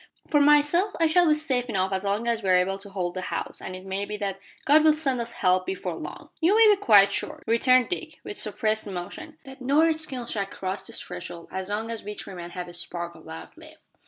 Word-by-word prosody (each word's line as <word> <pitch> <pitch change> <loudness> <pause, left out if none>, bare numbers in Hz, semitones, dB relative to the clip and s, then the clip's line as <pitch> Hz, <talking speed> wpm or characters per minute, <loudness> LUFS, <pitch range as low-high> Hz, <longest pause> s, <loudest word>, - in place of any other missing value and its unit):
For 295 -2 +4
myself, 295 +7 +4
I 330 - +4
shall 345 +2 +4
be 305 - +5
safe 265 -5 0
enough 190 -2 0
as 190 0 -2
long 205 +4 -1
as 230 -1 0
we 195 - -2
are 185 - +6
able 190 +2 +1
to 200 +1 -6
hold 180 -3 -3
the 185 - -4
house, - - -5
and 185 - -6
it 185 +1 -10
may 195 +1 -3
be 210 +1 -5
that 195 -2 -3 0.3
God 300 +2 +6
will 310 -1 +6
send 275 -5 -1
us 235 0 -5
help 185 -1 +1
before 385 - -3
long." - - -9
"You 345 +5 +3
may 450 -1 +7
be 400 - -4
quite 200 - +6
sure," - - -4
returned 250 +2 +3
Dick, 335 -3 -5
with - - -7
suppressed 215 0 -1
emotion, 300 - -7
"that 265 -1 -12
no 280 +5 +3
Redskin 310 -6 +1
shall 200 -4 -2
cross 190 0 -4
this - - -5
threshold 175 -1 -8
as 190 +1 -4
long 220 +2 -2
as 230 - -5
we 210 +1 -6
three 195 - -7
men 175 -1 -7
have 180 0 -6
a 175 - -10
spark 175 0 -4
o' - - -13
life 160 0 -10
left." 315 -1 -14
215 Hz, 245 wpm, -26 LUFS, 190-295 Hz, 0.3 s, may